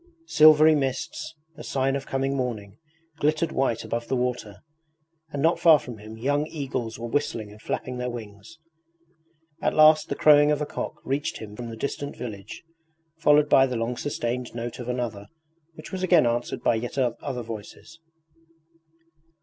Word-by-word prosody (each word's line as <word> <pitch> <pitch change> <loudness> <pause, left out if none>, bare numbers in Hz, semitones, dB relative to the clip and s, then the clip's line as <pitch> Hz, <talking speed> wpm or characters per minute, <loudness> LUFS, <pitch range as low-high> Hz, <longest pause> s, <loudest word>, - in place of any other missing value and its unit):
Silvery 155 - +7
mists, 135 +2 -3 0.2
a 155 - -9
sign 135 0 0
of 140 - -5
coming 135 +1 -1
morning, 115 -5 -4 0.4
glittered 155 +2 +1
white 125 -4 0
above 115 0 -3
the 130 - 0
water, 125 -5 -3 0.7
and 145 -1 -3
not 165 +1 +3
far 160 -3 +7
from 120 -5 -9
him 110 +1 -10
young 145 +5 0
eagles 130 -7 -4
were 120 +1 -5
whistling 115 -5 -2
and 105 +1 -15
flapping 125 +2 -4
their 125 0 -2
wings. 110 +3 -9 1.0
At - - 0
last 155 0 +6
the - - -1
crowing 145 -1 +6
of 150 -1 +2
a 150 - -1
cock - - -5
reached 140 +2 -2
him 105 -1 -9
from 120 +1 -7
the 115 - -8
distant 140 +3 -4
village, 105 -5 -8 0.6
followed 150 -2 +5
by 135 -2 +5
the 125 - -4
long 115 +2 -2
sustained 125 -3 -3
note 120 +1 -5
of 120 0 -6
another, 115 -5 -3 0.5
which 155 - -11
was 190 - -4
again 175 -6 +4
answered 120 0 -2
by - - +3
yet 120 +4 -4
other 125 0 -2
voices. 115 +8 -10
125 Hz, 165 wpm, -25 LUFS, 115-145 Hz, 1.0 s, Silvery